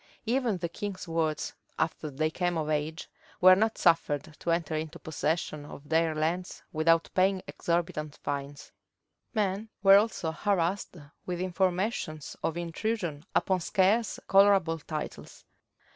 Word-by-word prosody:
Even 235 -3 +1
the 175 - -2
king's 185 +2 -6
wards, 165 -2 -1 0.2
after 160 -1 -1
they 155 +3 -1
came 175 0 -1
of 155 -1 -2
age, 155 +2 -2 0.3
were 185 +1 +9
not 220 +3 +1
suffered 160 -3 +2
to - - -4
enter 165 -2 0
into 160 +2 -4
possession 160 -1 -2
of 145 0 -11
their 160 0 +2
lands 170 +4 -2
without 165 +1 +3
paying 190 0 +2
exorbitant 165 -3 -2
fines. 140 0 -5 0.6
Men 205 +1 0
were 195 0 +9
also 205 -6 0
harassed 185 +1 -1 0.3
with 180 -1 -2
informations 185 -3 -1
of 165 - -1
intrusion 170 -2 -3
upon 190 -1 +2
scarce 200 +6 +2
colorable 195 -4 +5
titles. 155 0 -7
170 Hz, 130 wpm, -29 LUFS, 155-190 Hz, 0.6 s, were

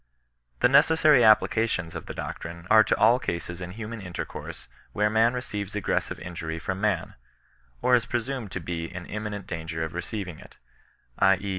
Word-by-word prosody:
The - - +7
necessary 150 0 +5
applications 110 -5 +3
of - - -7
the - - -6
doctrine 85 +1 -6
are 110 0 +8
to - - +1
all 115 +4 +5
cases 85 -3 -4
in 90 0 -6
human 110 +1 -6
intercourse 90 -2 -7 0.3
where 105 0 +2
man 115 +3 +3
receives 105 -5 -4
aggres 105 - 0
sive - - -7
injury 80 -2 -5
from 95 +3 -4
man, 105 -6 0 0.7
or 125 - +3
is 120 -1 +4
presumed 120 -3 -3
to - - -2
be 85 -1 -4
in 90 -1 -7
imminent 105 -2 -5
danger 80 -2 -4
of 80 - -5
receiving 90 -1 -5
it; - - -15 0.6
L 95 -1 +6
e. 100 0 -5
100 Hz, 175 wpm, -26 LUFS, 85-115 Hz, 0.7 s, are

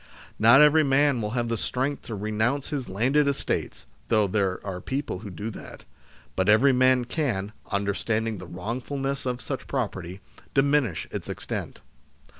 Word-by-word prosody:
Not 120 +6 +8
every 155 +1 +6
man 140 -2 +3
will 105 - -2
have 120 -1 0
the 115 0 -1
strength 135 +5 -2
to 115 - -5
renounce 110 +7 -1
his 135 -8 -3
landed 130 +9 +2
estates 140 - -2 0.2
(though 110 -1 +3
there 95 -2 0
are 95 -2 -4
people 135 -6 -3
who 100 - -8
do 100 +5 -5
that), - - -11 0.5
but 95 +2 +1
every 125 +6 +6
man 130 -1 +4
can, 115 -8 -2 0.2
understanding 105 +2 -1
the - - -9
wrongful 115 +10 -5
ness 135 0 -2
of 125 -1 -2
such 135 - -5
property, 95 -8 -3 0.4
diminish 135 - +2
its - - -5
extent. - - -5
120 Hz, 160 wpm, -26 LUFS, 100-135 Hz, 0.5 s, Not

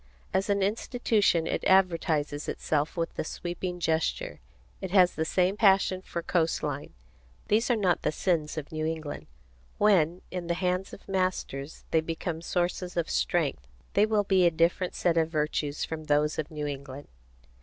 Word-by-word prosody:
As 195 - +1
an 200 -1 +2
institution 210 -4 +1
it - - -2
advertises 165 -6 +2
itself 150 +2 -1
with 165 0 -1
the - - -3
sweeping 175 +2 -5
gesture. 160 -1 -1 0.4
It 190 - -4
has 180 -1 +5
the 160 - -1
same 185 +3 +2
passion 195 -3 +4
for 170 -2 -5
coast 165 -2 0
line. 145 -1 -4 0.5
These 225 +4 +2
are 240 - +4
not 190 -5 +1
the - - 0
sins 160 -2 -1
of 150 -2 -5
New 155 -1 -3
England. 155 -2 -4 0.5
When, 180 -4 +3
in 180 -2 -4
the 170 - 0
hands 180 +1 -1
of - - -12
masters, 185 -7 -2
they 160 - +4
become 165 +1 -4
sources 175 +1 -2
of 170 - 0
strength, 140 - 0 0.3
they 210 - +4
will 215 -1 +2
be 190 -3 +4
a - - +6
different 170 +2 +1
set 170 -2 +1
of 160 -1 +2
virtues 150 -2 -1
from 155 -1 -6
those 150 +1 +1
of 155 - -3
New 150 -1 -4
England. 140 -1 -6
170 Hz, 170 wpm, -28 LUFS, 155-185 Hz, 0.5 s, a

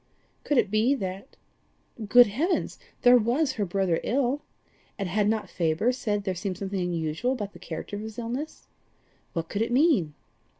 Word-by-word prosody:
Could 290 - +1
it 210 - +2
be 225 +6 +3
that? 195 0 -6 0.7
Good 245 +4 +8
heavens! 290 - -1 0.2
There 245 0 +7
was 255 +7 +1
her 210 - -2
brother 185 -2 0
ill! 270 +3 0 0.6
And 195 - -2
had 205 +3 +1
not 220 -1 -1
Faber 170 +8 +1
said 210 -5 -2
there 190 -2 -1
seemed 185 0 -4
something 195 -1 -3
unusual 170 +7 -1
about 205 -5 -5
the - - -13
character 170 +5 -6
of - - -6
his 220 0 -8
illness? 245 +6 -5 0.7
What 165 -2 -3
could 200 - -3
it 230 +1 0
mean? 245 - +3
210 Hz, 170 wpm, -27 LUFS, 190-245 Hz, 0.7 s, Good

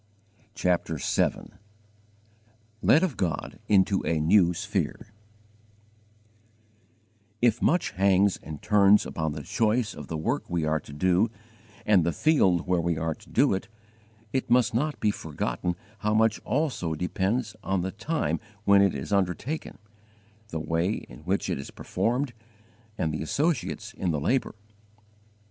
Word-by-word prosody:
CHAPTER 90 -3 0
VII - - 0 1.3
LED 155 +6 +5
OF 170 -9 -1
GOD 80 -5 -3
INTO 95 -1 +3
A 80 -1 0
NEW 85 +3 +4
SPHERE 110 +5 -3 2.3
IF 120 +1 +2
much 165 -7 +2
hangs 100 -1 +3
and 75 -2 -9
turns 105 0 +5
upon 80 -2 -3
the 75 - -6
choice 110 - 0
of 75 - -9
the 80 - -3
work 80 - -2
we 85 -2 0
are 80 0 +1
to 70 - -13
do 90 +8 +2 0.6
and 100 -5 +5
the 85 - +1
field 95 - +2
where 90 -2 +1
we 85 -1 0
are 80 0 -1
to - - -19
do - - +3
it, 95 +3 -3 0.7
it 130 -3 -1
must 120 -2 +4
not 145 +6 -1
be 105 - +2
forgotten 85 +1 -3 0.2
how 105 0 0
much 110 0 +3
also 130 - -1
depends 100 +6 -1
on 95 -1 0
the 95 +2 -3
time 155 - -2 0.2
when 100 -1 +6
it 100 -5 +3
is 70 +8 -4
undertaken, 100 - -1 0.7
the 80 -6 -4
way 85 +5 0
in - - -9
which - - 0
it - - -2
is 70 - -7
performed, 125 +2 -2 0.6
and 80 -1 -1
the 75 - -3
associates 120 - -1
in 90 - -2
the 75 -3 0
labour. 120 - 0
95 Hz, 145 wpm, -27 LUFS, 80-115 Hz, 2.3 s, when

